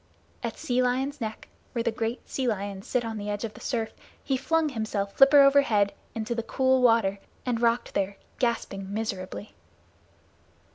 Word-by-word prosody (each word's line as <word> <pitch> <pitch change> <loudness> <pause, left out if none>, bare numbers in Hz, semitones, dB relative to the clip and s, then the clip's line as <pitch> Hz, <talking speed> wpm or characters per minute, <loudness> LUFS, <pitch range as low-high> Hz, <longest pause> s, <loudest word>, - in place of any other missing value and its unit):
At - - -4
Sea 255 -5 0
Lion's 265 +3 0
Neck, 220 -1 -5 0.3
where 235 -2 0
the 235 - +1
great 225 +1 -3
sea 260 -2 -2
lions 200 -3 -3
sit 245 -2 0
on 220 -1 -4
the 205 0 -4
edge 205 +1 -2
of 220 -2 -4
the - - -12
surf, 225 -4 -2 0.3
he 270 - 0
flung 315 +4 +1
himself 215 -5 -2
flipper 280 +1 +8
overhead 275 -8 +4 0.2
into 225 +1 -2
the 230 - -1
cool 260 +2 +2
water 225 -5 +4 0.3
and 240 -2 0
rocked 235 0 +1
there, 195 0 -1 0.2
gasping 200 -5 -1
miserably. 205 -2 -4
230 Hz, 165 wpm, -27 LUFS, 205-255 Hz, 0.3 s, flipper